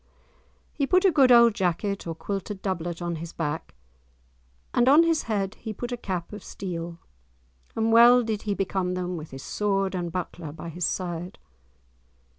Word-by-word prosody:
He 280 -3 -1
put 365 +4 +3
a 380 - +6
good 275 -5 +5
old 235 -2 +7
jack 180 -3 0
or 200 -5 -3
quilted 195 +2 -5
doublet 175 -3 -3
on 170 -1 -2
his 165 +1 -7
back, 150 - -4 1.0
and 245 +1 +4
on 300 +4 +7
his 330 -2 +2
head 200 -2 -1
he 220 -2 -5
put 245 +4 -6
a - - -1
cap 185 -6 -5
of 210 - -8
steel, 170 -3 -6 0.8
and 225 0 +1
well 240 +2 +7
did 220 -2 -2
he 205 -2 -2
become 190 -2 -1
them 180 0 -3
with 155 -2 -7
his 135 0 -9
sword 195 -2 -1
and 175 -2 -3
buckler 175 -3 -5
by 165 +2 -8
his 175 +1 -2
side! 180 0 -4
190 Hz, 175 wpm, -26 LUFS, 170-225 Hz, 1.0 s, old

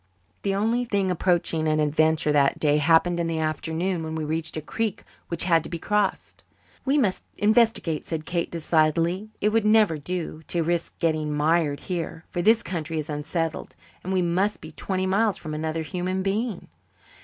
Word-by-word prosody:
The 195 -1 0
only 225 +5 +1
thing 200 -5 0
approaching 170 -3 +1
an 155 0 +2
adventure 155 +1 +2
that 140 -2 +3
day 150 -1 +3
happened 165 +3 +3
in 170 - 0
the 165 -1 -2
afternoon 160 +3 -1
when 160 0 -4
we 160 - -2
reached 160 +1 -2
a - - 0
creek 215 +6 -3 0.2
which 170 - 0
had 165 -3 +3
to - - -7
be 170 - -3
crossed. 205 +3 -1 0.4
"We 275 +2 +2
must 210 -10 +1
investigate," 215 -7 +2
said 160 -2 -4
Kate 170 +1 -1
decidedly. 165 +4 +1
"It 210 - +3
would 225 0 +2
never 215 -7 +4
do 165 0 -3
to 170 -1 0
risk 170 +1 -2
getting 155 -2 0
mired 150 0 +1
here, 165 -2 -4
for 175 - -2
this 225 +5 +4
country 165 -3 -4
is 155 0 -3
unsettled 160 +2 -3 0.3
and 185 - -4
we 185 -1 +2
must 185 +5 0
be - - -10
twenty 190 -1 -2
miles 200 +2 +2
from 155 -2 -6
another 160 +1 -2
human 185 +4 -2
being." 205 +1 -2
170 Hz, 180 wpm, -25 LUFS, 155-190 Hz, 0.4 s, never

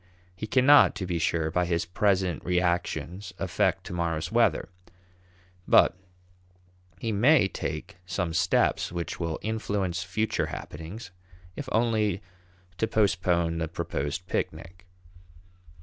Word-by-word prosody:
He 110 - -5
cannot, 130 +3 +6
to 95 -1 -4
be 85 -2 -2
sure, 80 -1 0
by 90 +2 +1
his 85 -1 0
present 95 -3 +1
reactions 90 +2 -1
affect 90 -2 0
to - - -7
morrow's 85 -1 -2
weather, 115 -7 +2 1.0
but - - +5 1.0
he 115 +4 -3
may 120 +3 +5
take 90 - -5
some 90 -2 -2
steps 90 +1 +2
which 85 -1 -4
will 85 -2 -2
influence 100 -5 -2
future 100 +5 -1
happenings, 90 +7 -8 0.4
if 140 -3 -6
only 110 -4 +1 0.6
to 110 - +1
postpone 90 -6 +1
the 80 - -1
proposed 75 +3 -3
picnic. 90 0 -4
90 Hz, 120 wpm, -27 LUFS, 85-105 Hz, 1.0 s, cannot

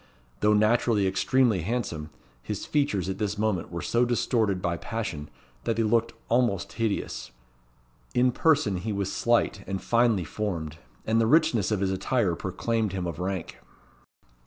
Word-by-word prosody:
Though 105 0 +4
naturally 110 -1 +3
extremely 105 +2 +2
handsome, 90 -7 -3 0.3
his 105 - -5
features 140 - 0
at 95 0 -3
this 105 -1 -1
moment 105 -6 -1
were 85 -2 -4
so 120 +8 +2
distorted 115 -5 +1
by 85 -1 -1
passion 100 -11 -4 0.3
that 115 - 0
they 115 - +1
looked 115 +1 +1
almost 115 -6 +1
hideous. 115 -3 -2 0.9
In 125 +1 +4
person 145 - +2
he 105 +5 -3
was 100 -1 -2
slight 120 -4 +1
and 95 0 -2
finely 115 -5 +2
formed; 80 -3 -4 0.3
and 115 +1 +2
the 110 - +2
richness 155 - +3
of 105 -3 0
his 95 -1 +1
attire 95 -1 0
proclaimed 110 +3 -2
him 95 -2 -2
of 85 -2 -4
rank. 95 -1 -4
105 Hz, 155 wpm, -27 LUFS, 95-115 Hz, 0.9 s, Though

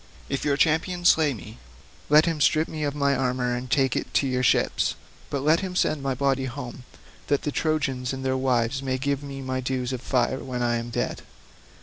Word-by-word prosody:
If 140 - -2
your 140 -1 +1
champion 175 +3 +1
slay 160 -4 +5
me, 110 -2 -9 0.5
let 150 +2 +7
him 165 -3 -1
strip 155 +2 +3
me 155 -1 -5
of 145 -1 -1
my 140 -1 +2
armour 125 -1 0
and 125 +1 -5
take 135 0 +2
it - - -3
to - - +3
your 130 -1 0
ships, 125 - +2 0.3
but 140 -1 -2
let 155 +3 +4
him 185 -2 -5
send 155 -5 +1
my 135 -1 -1
body 135 0 +1
home 125 -1 -7 0.4
that 145 0 +1
the 150 - -1
Trojans 140 -5 -1
and 135 0 -5
their 130 0 +1
wives 130 0 +1
may 130 -1 -1
give 140 +1 -1
me 140 -1 -7
my 130 0 -2
dues 130 0 -2
of 125 - -4
fire 130 0 0
when 125 -2 -3
I 120 0 +1
am 115 +1 -5
dead. 120 - -2
135 Hz, 215 wpm, -25 LUFS, 125-145 Hz, 0.5 s, let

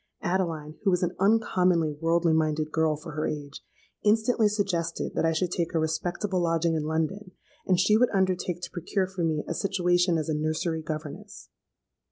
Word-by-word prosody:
Adeline, 165 -4 -1
who 200 - +3
was 180 -1 +1
an 175 0 -1
uncommonly 185 -6 +3
worldly 165 +2 +1
minded 155 -1 0
girl 160 -1 +2
for 150 - -9
her 155 +1 -2
age, 145 -1 -6 0.4
instantly 220 +1 +3
suggested 185 -6 -1
that - - 0
I 165 - +3
should 170 +2 -1
take 170 -1 -2
a - - +3
respectable 175 +4 -1
lodging 165 -1 +1
in 155 -2 -1
London, 180 +5 -2 0.3
and 185 -2 +3
she 210 +3 +4
would 245 +2 +4
undertake 185 -2 0
to - - -6
procure 185 +3 -1
for 185 -2 -4
me 155 -2 0
a - - -2
situation 180 -3 +1
as 155 - -2
a 155 - 0
nursery 155 +2 -1
governess. 155 -1 -7
170 Hz, 180 wpm, -27 LUFS, 160-185 Hz, 0.4 s, she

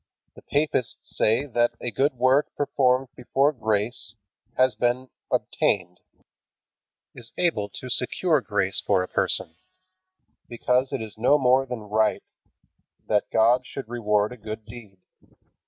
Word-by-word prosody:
The - - -15
papists 145 -4 -2
say 115 +6 +2
that 120 -3 +1
a 120 - -3
good 140 +6 +1
work 130 +4 +2
performed 130 -2 +1
before 135 +3 +1
grace 110 -1 -2 0.4
has 130 -1 +4
been 120 +3 -1 0.2
obtained, 90 -2 0 1.1
is 115 -2 -7
able 110 -13 +1
to 125 - -8
secure 145 +5 +1
grace 100 -3 0
for 95 -3 +2
a - - -5
person, 80 0 0 0.9
because 125 +2 0
it - - -3
is 110 -1 -10
no 135 +6 +4
more 130 0 +3
than 125 -3 -5
right 110 +1 +1 0.8
that 105 -1 0
God 120 +3 +3
should 135 -5 -7
reward 105 -3 +1
a 125 - -9
good 110 0 -7
deed. 110 -3 -12
120 Hz, 135 wpm, -25 LUFS, 105-130 Hz, 1.1 s, has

